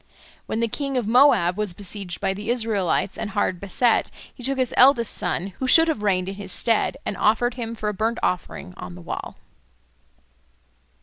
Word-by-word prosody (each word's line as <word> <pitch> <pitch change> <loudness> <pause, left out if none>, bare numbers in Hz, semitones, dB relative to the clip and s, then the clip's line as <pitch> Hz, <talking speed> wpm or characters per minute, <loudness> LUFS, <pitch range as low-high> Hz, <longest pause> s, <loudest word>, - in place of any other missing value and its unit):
When 225 - -2
the 230 - +2
king 275 +3 -3
of 245 - 0
Moab 225 -8 +4
was 205 -5 -1
besieged 195 -3 -4
by 195 -1 0
the 205 +3 -7
Israelites 215 -6 0
and 215 - -3
hard 195 -3 -1
beset, 220 +5 +1 0.2
he - - -14
took 270 +2 -2
his 255 -2 0
eldest 250 -3 +5
son, 190 +2 -3
who 260 - -1
should 325 +5 +6
have 315 -10 -1
reigned 185 -3 +1
in 195 - -4
his 195 -1 -6
stead, 230 -2 +1
and - - -2
offered 235 +3 +2
him 230 -2 -5
for 215 -1 -4
a 210 - 0
burnt 220 +4 -1
offering 180 - -3
on 90 -1 -8
the 90 - -11
wall. - - -6
215 Hz, 190 wpm, -23 LUFS, 195-245 Hz, 0.2 s, should